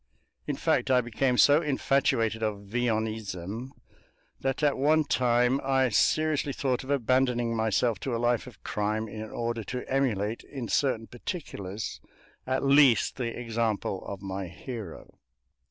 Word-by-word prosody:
In - - -1
fact, - - +1
I 130 -1 +5
became 125 +1 0
so 145 +5 +6
infatuated 135 -6 +1
of 105 -2 -2
Villonism 110 -1 -2 0.7
that 135 +2 -2
at 145 -1 +3
one 155 +3 +3
time 125 0 +2
I 135 -1 +2
seriously 150 +3 +2
thought 130 -2 -1
of 130 - -11
abandoning 125 -3 +1
myself 110 +1 +1
to 130 -3 -2
a - - 0
life 120 +1 +1
of 125 - -14
crime 105 +1 -1
in 110 0 -7
order 115 0 -3
to 125 0 -5
emulate 115 -5 0
in 130 -5 -7
certain 125 -5 +1
particulars 110 - -6 0.5
at 130 +1 0
least 140 -3 +5
the 120 -2 -3
example 115 -5 -2
of 100 0 -7
my 95 -1 -4
hero. 105 +1 -9
120 Hz, 140 wpm, -28 LUFS, 110-135 Hz, 0.7 s, so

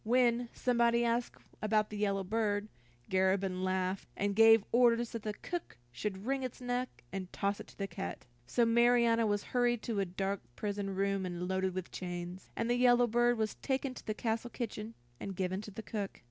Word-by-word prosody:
When 240 0 +3
somebody 235 -1 +2
asked 235 +1 0 0.3
about 215 0 +2
the 210 - -4
yellow 200 -1 +1
bird, 205 0 0 0.4
Garabin 190 0 +2
laughed, 185 0 -1
and 200 0 0
gave 225 -1 +7
orders 240 -1 +4
that 230 - -4
the 210 0 -3
cook 345 - -5
should 190 - -4
wring 270 +1 0
its 255 -2 -5
neck, 250 - -3
and 185 -2 -4
toss 200 0 -1
it - - -8
to - - -17
the 195 - -1
cat. 90 - -6 0.2
So 240 - +3
Marianna 235 -1 +4
was 205 -1 0
hurried 240 -2 +2
to 225 -4 -1
a 195 - +2
dark 195 +2 -2
prison 200 - -3
room 195 0 +1
and 180 -1 -3
loaded 190 0 0
with 185 -2 -4
chains, 175 0 -6
and 230 - -1
the 240 - +3
yellow 245 0 +5
bird 240 +1 +3
was 220 -1 0
taken 265 -1 -1
to - - -12
the 215 - -1
castle 225 +1 -1
kitchen, 225 -2 -5 0.2
and 195 - -5
given 185 +1 -1
to 215 - -8
the 210 +2 -8
cook. 205 -3 -4
215 Hz, 195 wpm, -33 LUFS, 195-235 Hz, 0.4 s, gave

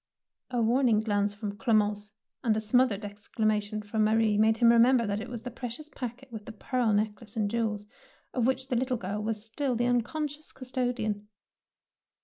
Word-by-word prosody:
" - - -63
A 245 -2 0
warning 235 -1 +3
glance 205 -2 +1
from 205 0 -6
Clemence 210 -2 +1 0.3
and 220 -3 +2
a - - +2
smothered 220 -1 +2
exclamation 210 0 -2
from 215 +1 0
Ma 215 +1 +3
rie 220 -2 +3
made 220 +1 +4
him 235 -1 +6
remember 235 +1 +5
that 205 0 -1
it 230 - -7
was 235 -2 -6
the 250 - -5
precious 250 +5 -6
packet 255 -1 -7
with 215 -2 -7
the - - -5
pearl 235 +2 0
necklace 210 +1 -1
and 205 -2 0
jewels, 220 -3 -1 0.5
of 245 -2 +1
which 260 0 -1
the 250 - 0
little 255 +1 0
girl 205 +1 -3
was 215 0 -3
still 250 +3 -1
the 240 +1 +1
unconscious 290 +5 -1
custodian. 245 -5 -2
225 Hz, 185 wpm, -29 LUFS, 210-250 Hz, 0.5 s, him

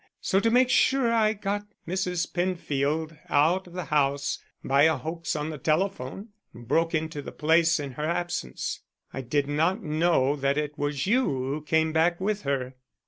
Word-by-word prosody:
So 190 - +1
to 230 - +2
make 250 +2 +4
sure 260 -4 +3
I 220 -2 +3
got 205 0 -3 0.2
Mrs. 180 -1 -2
Penfield 160 -3 -1
out 165 +6 +2
of 175 - -14
the 180 0 -4
house 140 -2 0 0.2
by 140 +2 +4
a 160 - +4
hoax 165 +1 -4
on 150 +1 -2
the 150 - -7
telephone 180 - -1 0.3
and 120 0 -12
broke 165 +5 +2
into 155 -1 -2
the - - -8
place 165 +2 +3
in 140 -2 -5
her 150 +4 -4
absence. 170 - -3 0.3
I 135 - -4
did 140 +3 0
not 165 +9 +1
know 155 -3 +2
that 140 +1 0
it 150 -1 -2
was 145 -2 -2
you 250 +6 +3
who 135 +3 -2
came 160 +1 +1
back 170 +2 +2
with 205 +2 -1
her." 130 -2 -2
160 Hz, 180 wpm, -26 LUFS, 145-180 Hz, 0.3 s, make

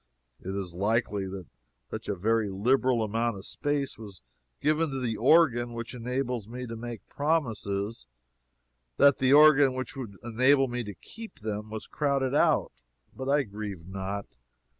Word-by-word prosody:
It 95 +1 -5
is 95 -3 -4
likely 100 +1 0
that 95 -1 -7 0.5
such - - -6
a 100 - 0
very 110 +3 +1
liberal 120 +4 +2
amount 115 +1 -1
of 95 - -9
space 145 -4 -2
was 100 - -11 0.4
given 155 +2 +1
to 135 -1 -3
the 120 -3 -1
organ 120 -2 +4
which 115 +1 -6
enables 125 -2 -3
me 125 +2 -6
to 115 -1 -6
make 115 -1 -7
promises, 115 - -1 0.9
that 140 -1 +6
the 130 0 +3
organ 145 -3 +7
which 130 0 -3
should 115 -8 -8
enable 130 +4 +3
me 120 0 -3
to 105 -1 -7
keep 225 - -12
them 105 0 -4
was 110 0 -6
crowded 140 -3 0
out. 145 - +3 0.4
But 130 +1 -4
I 145 0 +3
grieve 100 -6 -7
not. 95 +2 -4
115 Hz, 160 wpm, -28 LUFS, 105-135 Hz, 0.9 s, organ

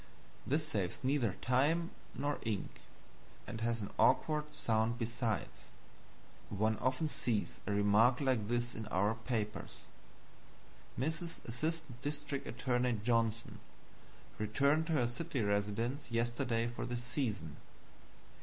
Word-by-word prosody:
This 150 +3 +1
saves 100 - -1
neither 130 -6 +2
time 150 +7 +3 0.2
nor 145 0 -1
ink, 110 -4 -3 0.6
and 110 - -5
has 115 0 0
an 100 - -5
awkward 150 +3 +4
sound 110 +1 +1
besides. 115 -3 -2 0.8
One 110 +2 +1
often 130 +5 +1
sees 115 -7 -1
a - - +1
remark 105 +5 +5
like 130 -7 +1
this 120 +1 0
in 110 -1 -5
our 105 +1 +2
papers: 110 -2 -3 1.1
"MRS. 160 +6 -3
Assistant 150 +1 -3
District 145 0 -3
Attorney 125 -3 +1
Johnson 115 -1 +1 0.8
returned 140 +9 +2
to 165 - +1
her 125 -6 +3
city 130 +1 -2
residence 105 +7 0
yesterday 115 0 +1
for 120 - -4
the 120 - -2
season." 120 - -2
120 Hz, 115 wpm, -35 LUFS, 110-140 Hz, 1.1 s, remark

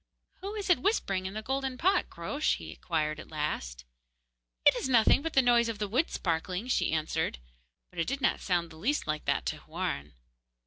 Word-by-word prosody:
'Who 400 +3 -6
is 415 -2 -4
it 355 - +4
whispering 195 - +1
in 190 - -7
the 215 - -4
golden 265 +1 -2
pot, 370 +4 +2
Groac'h?' 285 - -1
he - - -8
inquired 155 -3 -2
at - - -10
last. - - -3 0.8
'It - - +8
is 265 - -2
nothing 235 +2 +5
but 325 +1 -3
the 270 - +5
noise 240 -1 +4
of 225 - -3
the 210 0 -2
wood 255 +11 +1
sparkling,' 180 +6 -2
she - - +2
answered; 160 - -1 0.5
but 180 - -8
it 165 - 0
did 275 +2 -1
not - - +2
sound 175 -3 0
the 160 - -12
least 270 - 0
like 155 -1 -2
that - - +1
to - - -2
Houarn. 75 +1 -4
210 Hz, 205 wpm, -30 LUFS, 165-270 Hz, 0.8 s, It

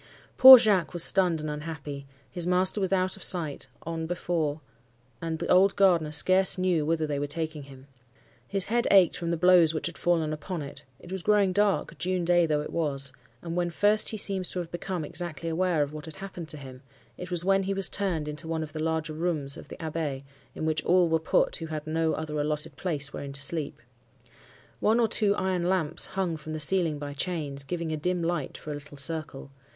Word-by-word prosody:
Poor 260 0 +12
Jacques 205 -9 +2
was 175 -1 +3
stunned 180 -4 +4
and 155 - -5
unhappy,—his 150 +1 -7
master 185 +3 +1
was 190 -1 -1
out 185 -1 +2
of 195 - -12
sight, 155 -7 +2 0.2
on 165 0 -4
before; 165 -3 -2 0.6
and 165 -1 -3
the - - -4
old 190 +2 +4
gardener 175 -6 +3
scarce 185 +5 +4
knew 180 -4 +1
whither 160 +1 0
they 145 -2 -3
were 145 - -2
taking 155 0 -3
him. 135 -1 -14 0.6
His 195 -1 +1
head 235 +2 0
ached 190 -4 +5
from 170 -1 -4
the 170 - 0
blows 170 -2 +5
which 155 - -3
had 170 - -4
fallen 165 -3 +1
upon 155 +2 -5
it; 140 0 -8
it 175 - -14
was 190 -1 -4
growing 205 -1 +2
dark—June 185 -3 0
day 175 -1 +3
though 150 -1 0
it 150 - -7
was,—and 140 -1 -4
when 175 -1 0
first 205 +5 +2
he 220 - -3
seems 195 -3 -1
to - - -6
have 175 -2 -4
become 175 -2 -4
exactly 165 0 -5
aware 165 -2 +1
of 145 +1 -6
what 155 -1 -8
had 160 - -9
happened 190 -4 -8
to 155 - -4
him, 130 -2 -11 0.3
it 180 - -8
was 175 -1 -1
when 195 0 +3
he 195 +1 -2
was 195 -2 +1
turned 180 -7 -2
into 150 +2 -7
one 160 -1 -2
of 155 -1 -9
the 155 - -4
larger 160 -1 -2
rooms 155 -4 -1
of - - -11
the - - -10
Abbaye, 155 -4 -4 0.3
in - - -4
which 155 0 0
all 180 -1 +3
were 160 0 +2
put 160 - +1
who 165 - -6
had 155 -1 -5
no 160 0 0
other 155 -1 -4
allotted 150 0 -2
place 145 -6 -2
wherein 140 -1 -6
to 140 - -2
sleep. 150 +2 -2 1.0
One 220 +3 +2
or 230 - +3
two 205 -2 +2
iron 180 -2 -1
lamps 180 -6 0
hung 180 -4 -1
from 155 +1 -8
the 155 - -4
ceiling 165 -1 +2
by 145 0 -6
chains, 145 -3 -3
giving 165 +3 -4
a 155 - -2
dim 180 +3 -1
light 165 -5 -2
for 155 - -8
a - - -3
little 145 0 -10
circle. 155 -2 -5
165 Hz, 215 wpm, -27 LUFS, 150-185 Hz, 1.0 s, Poor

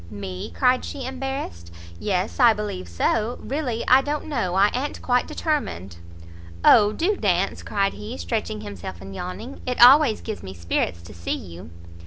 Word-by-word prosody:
"Me?" 95 -3 -6
cried 255 -1 +2
she, 270 -3 -6
embarrassed, 260 - -5 0.3
"yes, 190 +3 -1
I 240 -3 +7
believe 210 - -5
so, 215 - 0
really 260 -5 -3
I 260 +1 +7
don't 295 +2 -3
know, 230 - -2
I 200 +2 +4
a'n't 275 +4 -3
quite 250 -1 +2
determined." 285 - -3 0.7
"O, 210 -2 +7
do 355 - 0
dance!" 195 - 0
cried 200 -1 0
he, 105 -3 -7
stretching 85 +4 -3
himself 95 -4 -7
and 95 +1 -9
yawning, 210 - -7
"it 250 - -2
always 255 -1 +7
gives 220 -2 -6
me 95 0 -8
spirits 85 0 -2
to 85 - -12
see 85 0 -3
you." 85 -3 -10
205 Hz, 165 wpm, -23 LUFS, -, 0.7 s, I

